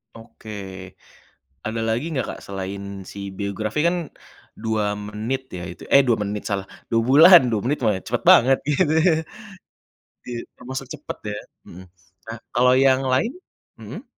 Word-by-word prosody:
Oke. 115 -1 -14 1.2
Ada 115 +1 -2
lagi 115 +6 -1
enggak, 130 -5 -1
Kak, - - -12
selain 100 0 -6
si 100 -1 -7
biografi 105 +5 -3
kan, 175 - +1 0.6
2 110 -2 -1
menit 105 +6 -4
ya 90 - -6
itu? 85 - -9
Eh, 140 - +9
2 120 -3 +2
menit 105 0 -3
salah, 100 -2 -2 0.3
2 115 - +3
bulan 170 +6 +9
2 110 - +1
menit 145 +4 0
mah 105 -4 +2
cepet - - -1
banget. 130 +2 +6
Gitu 150 +1 +2
ya. 170 -1 +4 1.2
Iya, 120 -1 -4 0.2
termasuk 130 +1 -6
cepet 150 -1 -7 0.2
ya? 105 - -5 0.3
Mhm. 90 +2 -12 0.4
Nah, 115 0 -6
kalau 125 +1 +4
yang 135 0 +4
lain? 130 - +1 0.5
Mhm. - - -9
115 Hz, 150 wpm, -22 LUFS, 105-130 Hz, 1.2 s, Eh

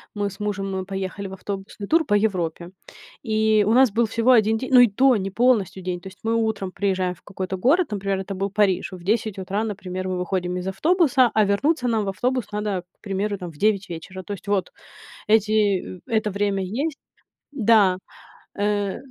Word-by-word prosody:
Мы 205 -1 -1
с 195 +1 -13
мужем 195 -2 -3
поехали 195 +1 -4
в 190 - -9
автобусный 195 +1 -6
тур 320 +4 +3
по 205 - +2
Европе. 180 -5 -1 0.5
И 220 -2 +2
у 220 - +3
нас 260 -1 +5
был 230 +2 +1
всего 230 +3 +2
1 220 -2 +4
день 260 +4 -5
ну 250 - +9
и 245 - +8
то, 255 +5 +4
не 195 -2 -2
полностью 200 -5 +1
день. 180 -1 -3
То 190 - -10
есть 190 - -13
мы 225 +1 0
утром 220 -4 -1
приезжаем 185 -2 -1
в 180 - -21
какой-то 190 -1 -5
город, 290 - +2
например, 195 -1 -1
это 195 +1 -5
был 195 +1 -2
Париж. 200 -2 +1
В 180 -2 -10
10 215 +1 0
утра, 195 +3 -2
например, 185 -3 -4
мы 185 -1 -2
выходим 180 0 -2
из 180 +1 -4
автобуса, 275 - +3
а 215 -1 +4
вернуться 250 +8 +1
нам 225 -3 +1
в - - -1
автобус 245 +5 -2
надо, 205 -3 -2 0.2
к - - -66
примеру, 200 0 -2
там, 180 -3 -7
в 150 - -18
9 200 0 +1
вечера. 185 +3 -7
То 205 - -5
есть 200 0 -10
вот, 200 -2 0 0.6
эти 210 -3 +2
э - - -22
это 220 -2 0
время 200 -1 -1
есть 275 - -3 0.5
да. 215 -8 +4 0.6
Э. 205 -1 0
200 Hz, 200 wpm, -23 LUFS, 190-220 Hz, 0.6 s, ну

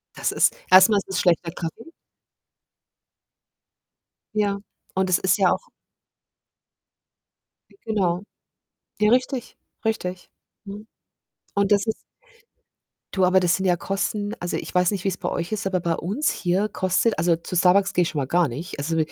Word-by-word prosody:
Das - - -1
ist - - +3
erstmal 190 +3 +7
ist 195 - -11
es 190 - -1
schlechter 170 -2 +2
Kaffee. 165 +5 -6 2.5
Ja, 205 -1 +1 0.4
und 190 -1 +1
es 180 - +3
ist 190 +2 +2
ja 190 -3 +4
auch - - -3 2.2
Genau. 190 -4 0 0.8
Ja, 210 0 +4
richtig, 255 0 0 0.3
richtig, 180 -5 -3 0.4
ne? 205 +2 -8 0.7
Und 200 0 +1
das 205 +2 +3
ist 220 - -3 1.1
Du, 190 -2 +3
aber 185 +1 +4
das 180 -1 +2
sind 190 - -3
ja 175 - +3
Kosten 205 +3 -2
also, 175 - -3
ich - - -7
weiß 180 -1 +3
nicht, 195 -3 -3
wie's 190 -2 -1
bei - - -3
euch 170 +4 -3
ist, 210 -2 -2
aber 185 -1 0
bei 170 -1 -1
uns 205 - -1
hier 185 +3 0
kostet 190 +2 0
also, 170 0 +3
zu 170 +2 -7
Starbucks 190 +3 +4
gehe 180 - +3
schon 165 - -4
mal 135 - -1
gar 170 +4 +2
nicht. 150 +9 -7
Also 165 +3 -2
190 Hz, 155 wpm, -23 LUFS, 175-205 Hz, 2.5 s, erstmal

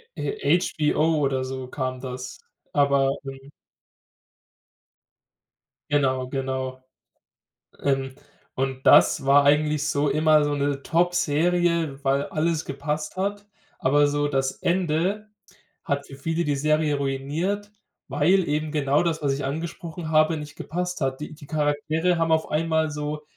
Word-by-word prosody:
äh, 415 - +1
HBO 155 -1 +1
oder 135 -2 0
so 130 0 -5
kam 130 -1 -4
das. 125 -1 -6 0.4
Aber 140 -1 +3
mhm. 135 +1 -10 2.4
Genau, 130 -3 +1
genau. 130 -1 -3 1.0
Ähm, 135 -1 -1 0.4
und 130 0 -3
das 150 - +6
war 140 +1 +5
eigentlich 150 +1 +2
so 145 0 +1
immer 155 +1 +4
so 145 0 0
'ne 140 -1 -1
Topserie, 170 -2 +1
weil 140 +1 +1
alles 160 0 -1
gepasst 150 +3 -4
hat, 200 +2 -2 0.3
aber 145 +2 +3
so 145 0 0
das 135 -2 0
Ende 180 +4 0 0.6
hat 140 -4 -2
für 135 - -11
viele 165 +4 -2
die 145 -2 0
Serie 155 +1 +1
ruiniert, 150 +10 -2 0.4
weil 165 +7 +2
eben 150 +1 -1
genau 145 -1 +2
das, 160 -2 -1
was 140 -2 +1
ich 135 0 -3
angesprochen 160 +3 -5
habe, 155 +1 +4
nicht 150 -1 -8
gepasst 180 +2 -4
hat. 135 0 -1
Die 150 - -6
die 150 -1 -13
Charaktere 155 +3 0
haben 165 -1 +1
auf 160 0 +1
einmal 160 0 +1
so 150 0 -4
150 Hz, 135 wpm, -24 LUFS, 135-160 Hz, 2.4 s, das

